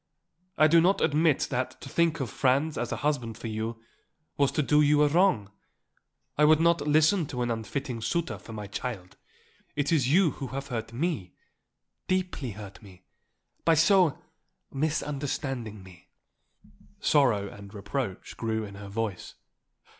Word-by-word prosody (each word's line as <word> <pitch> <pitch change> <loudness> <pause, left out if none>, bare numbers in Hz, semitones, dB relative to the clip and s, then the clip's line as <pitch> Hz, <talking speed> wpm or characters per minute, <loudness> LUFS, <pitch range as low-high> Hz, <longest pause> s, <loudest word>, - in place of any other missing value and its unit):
I 155 - +6
do 165 +2 +6
not 185 +4 +3
admit 155 0 +2
that 130 -1 -2
to - - -8
think 165 -1 +1
of 125 -6 -3
Franz 140 +4 +1
as 120 0 -3
a - - 0
husband 125 -7 -1
for - - -10
you 110 +1 -4 0.5
was 140 -2 +2
to 150 - +1
do 150 +2 +4
you 150 0 +4
a - - +5
wrong. 145 - +2 0.9
I - - +5
would 155 +1 +6
not 170 0 +3
listen 155 +3 +3
to 125 -3 -3
an 120 - -1
unfitting 115 +2 -4
suitor 170 +7 -2
for - - -12
my 105 -2 -6
child. 100 -3 -6 0.6
It 145 +1 0
is 140 -5 +2
you 175 -1 +4
who 135 - -6
have 135 +2 -6
hurt 115 -3 -4
me 130 - -3 0.7
deeply 185 - -1
hurt 100 -2 -10
me 95 -3 -16 0.6
by 165 0 +4
so 175 -1 +4 0.5
misunderstanding 135 -6 -3
me." 90 -2 -16 0.9
Sorrow 120 -9 +3
and 100 0 -12
reproach 105 0 -5
grew 110 -1 -2
in 100 -1 -8
her 100 0 -9
voice. 105 -3 -4
135 Hz, 155 wpm, -28 LUFS, 110-155 Hz, 0.9 s, I